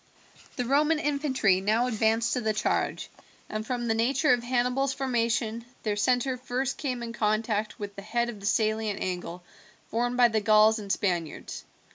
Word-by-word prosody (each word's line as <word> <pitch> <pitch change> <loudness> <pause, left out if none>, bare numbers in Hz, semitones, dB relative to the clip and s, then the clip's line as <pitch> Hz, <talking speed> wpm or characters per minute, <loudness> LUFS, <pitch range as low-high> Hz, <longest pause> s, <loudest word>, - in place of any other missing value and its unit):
The 250 - -2
Roman 300 +5 +3
infantry 280 -10 +1
now 220 +5 +2
advanced 225 -1 +1
to 250 - 0
the 215 -1 0
charge, 210 - -1 0.4
and 215 0 -4
from 240 +1 -3
the 225 - +2
nature 250 +5 +2
of 245 - +1
Hannibal's 250 +2 0
formation 235 -3 -1 0.2
their 210 -2 0
centre 250 +4 +1
first 255 +1 -2
came 250 -5 -3
in 230 0 -5
contact 215 -1 -1
with 205 -1 -7
the 200 - -7
head 235 +4 -1
of 225 -4 -7
the 200 - -4
salient 215 -1 0
angle 180 -1 -4 0.5
formed 245 +2 0
by 245 -1 +7
the 220 -1 0
Gauls 215 +1 +5
and 200 -2 -5
Spaniards. 175 -6 -2
230 Hz, 170 wpm, -27 LUFS, 215-250 Hz, 0.5 s, by